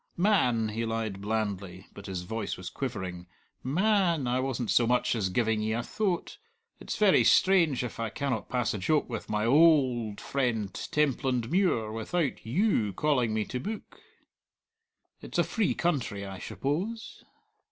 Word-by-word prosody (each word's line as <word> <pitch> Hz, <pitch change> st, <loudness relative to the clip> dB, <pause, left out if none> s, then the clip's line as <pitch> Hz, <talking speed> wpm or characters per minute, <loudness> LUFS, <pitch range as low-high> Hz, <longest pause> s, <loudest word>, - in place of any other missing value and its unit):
"Man," 125 Hz, -, +2 dB
he 110 Hz, +2 st, -3 dB
lied 110 Hz, -3 st, -3 dB
blandly, 100 Hz, -3 st, -3 dB
but 100 Hz, -, -10 dB
his 95 Hz, -2 st, -4 dB
voice 110 Hz, +3 st, -4 dB
was 90 Hz, -1 st, -7 dB
quivering 95 Hz, -9 st, -5 dB, 0.3 s
"ma 190 Hz, +6 st, +2 dB
a -, -, 0 dB
an, 145 Hz, -5 st, -4 dB
I 125 Hz, +1 st, +1 dB
wasn't 130 Hz, -3 st, -2 dB
so 120 Hz, -, +4 dB
much 125 Hz, +1 st, +2 dB
as 100 Hz, -5 st, 0 dB
giving 110 Hz, +2 st, +1 dB
ye 110 Hz, +1 st, -1 dB
a 115 Hz, +1 st, -1 dB
thoat! 200 Hz, -, -2 dB, 0.4 s
It's -, -, -5 dB
verra 205 Hz, -3 st, +5 dB
strange 170 Hz, -9 st, +4 dB
if 120 Hz, -, -6 dB
I 115 Hz, -1 st, -1 dB
cannot 130 Hz, -1 st, -3 dB
pass 125 Hz, -3 st, 0 dB
a 105 Hz, -, -4 dB
joke 150 Hz, +9 st, +1 dB
with -, -, -6 dB
my 105 Hz, 0 st, 0 dB
o 115 Hz, -, +2 dB
old 130 Hz, -9 st, +4 dB
friend 115 Hz, -7 st, -1 dB
Templandmuir 130 Hz, -, 0 dB
without 135 Hz, +8 st, -2 dB
you 120 Hz, -, +1 dB
calling 130 Hz, -7 st, +1 dB
me 110 Hz, -1 st, 0 dB
to 125 Hz, -, -4 dB
book. 215 Hz, -, -7 dB, 1.2 s
It's -, -, -6 dB
a -, -, +4 dB
free 220 Hz, -5 st, 0 dB
country, 125 Hz, -12 st, -1 dB
I 95 Hz, -1 st, -7 dB
shuppose! 195 Hz, +11 st, -4 dB
120 Hz, 165 wpm, -28 LUFS, 110-155 Hz, 1.2 s, verra